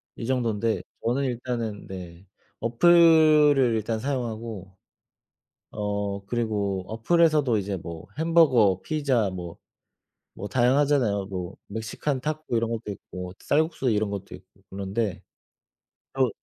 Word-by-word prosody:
이 115 - -6
정돈데 115 -4 0 0.2
저는 125 +4 +1
일단은 120 -4 -3
네. 90 -1 -9 0.3
어플을 150 0 +5
일단 110 +1 -2
사용하고 115 -7 -4 1.0
어 100 -1 -3
그리고 105 -5 -1
어플에서도 145 +2 +2
이제 100 0 -3
뭐 85 0 -8
햄버거 135 - +4
피자 135 -9 0
뭐 90 -2 -7 0.8
뭐 100 - -6
다양하잖아요. 125 -5 +2
뭐 95 -1 -5
멕시칸 110 +6 -3
타코 155 -2 -3
이런 115 0 +1
것도 115 -2 -4
있고 90 -2 -8
쌀국수 155 -2 0
이런 105 -1 0
것도 100 -2 -6
있고 95 +1 -16
그런데 100 0 -3 0.9
어. 130 -2 +2
115 Hz, 250 characters per minute, -25 LUFS, 100-135 Hz, 1.0 s, 어플을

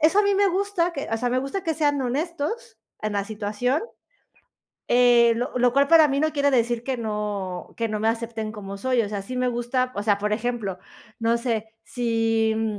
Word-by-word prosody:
eso 325 +6 +4
a - - +6
mí 400 -1 +2
me 400 0 +4
gusta 375 -2 0
que 280 - -5
o 225 - +1
sea, 245 +2 -1
me 255 - +1
gusta 275 +9 -3
que 325 -1 -1
sean 290 -2 +1
honestos 295 - -3 0.2
en 215 0 -2
la 200 -1 -1
situación, 215 +6 -1 1.1
eh, 240 -1 +5
lo 245 +2 -2
lo 245 0 +3
cual 280 +1 +4
para 320 -1 +7
mí 275 0 0
no 310 0 +1
quiere 285 -1 +2
decir 240 -2 +1
que 260 +1 -2
no 210 -5 -4
que 230 - 0
no 215 -1 -3
me 220 - +2
acepten 225 -1 -3
como 200 -2 -7
soy. 255 +1 +1
O 205 - -3
sea, 205 -1 -3
sí 225 +6 -6
me 250 0 +1
gusta 245 +1 -1
o 205 - -3
sea, 205 -1 +3
por 210 +1 -1
ejemplo, 220 -4 -2 0.4
no 230 0 +2
sé, 230 -2 -2 0.2
si, 225 -2 +1
mm, 220 -2 -1
240 Hz, 215 wpm, -24 LUFS, 220-275 Hz, 1.1 s, para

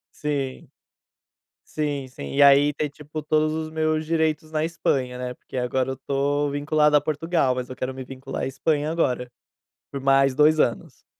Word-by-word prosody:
Sim. 140 -3 -3 1.0
Sim, 145 -3 -2
sim. 70 - -8
E 140 - +6
aí 140 +1 +6
ter, 150 +1 -2
tipo, 150 +1 -8
todos 155 0 +2
os 155 0 -4
meus 155 0 0
direitos 160 -1 0
na 155 0 0
Espanha, 135 -6 -1
né, 125 0 -4
porque 130 - -10
agora 125 +1 0
eu 130 - -2
estou 140 +2 -1
vinculado 150 +1 +2
a 145 - +5
Portugal, 155 -3 0
mas 125 -1 -4
eu 130 - -7
quero 130 +1 -3
me 130 0 -7
vincular 135 +1 -6
a - - +1
Espanha 150 +3 0
agora, 125 -7 -1 0.6
por 140 -1 -6
mais 135 -1 +3
2 155 +1 +4
anos. 120 - -1
145 Hz, 175 wpm, -24 LUFS, 130-155 Hz, 1.0 s, E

